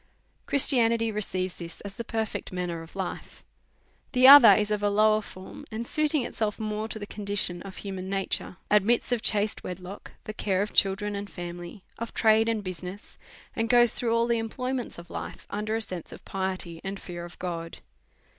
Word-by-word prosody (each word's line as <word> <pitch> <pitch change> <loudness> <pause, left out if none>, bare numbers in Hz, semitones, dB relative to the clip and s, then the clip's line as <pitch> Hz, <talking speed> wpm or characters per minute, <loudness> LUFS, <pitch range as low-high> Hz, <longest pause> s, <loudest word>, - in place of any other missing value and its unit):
" - - -41
Christianity 230 -5 +3
receives 185 -3 -2
this 170 -1 -9
as 200 -1 -8
the 235 - -5
perfect 220 -1 -3
manner 180 -2 -3
of 165 - -12
hfe. 190 -2 -6 0.3
" - - -38
The 255 0 +6
other 280 -3 +11
is 210 0 +1
of 210 -1 0
a 205 - +2
lower 215 +1 +4
form, 185 -2 -11
and, 225 +1 -4
suiting 300 -1 +2
itself 215 -2 -2
more 215 0 -3
to 225 - -6
the 205 - -6
condition 200 -4 -1
of 195 -1 -9
human 190 -2 -6
nature, 195 -2 -1
admits 210 +4 +3
of 240 -2 +1
chaste 210 -1 +1
wedlock, 185 +2 -8
and 215 - -7
care 195 -1 +1
of 210 - -6
children 200 +1 +2
and 200 0 -5
family, 175 +2 -8 0.2
of 230 0 -6
trade 220 0 +4
and 220 -2 -1
business, 185 +1 -7 0.4
and 225 0 -1
goes 240 -2 +5
through 230 -2 0
all 230 0 +3
the 235 -1 +1
employ 250 +3 -3
ments 255 -2 -4
of 170 0 -11
life - - -7
under 215 +2 -2
a 225 - -1
sense 180 -5 -7
of - - -12
piety 185 -3 -4
and 195 0 -5
fear 175 -1 -7
of 175 0 -10
God. 165 -2 -5
205 Hz, 195 wpm, -27 LUFS, 185-225 Hz, 0.4 s, other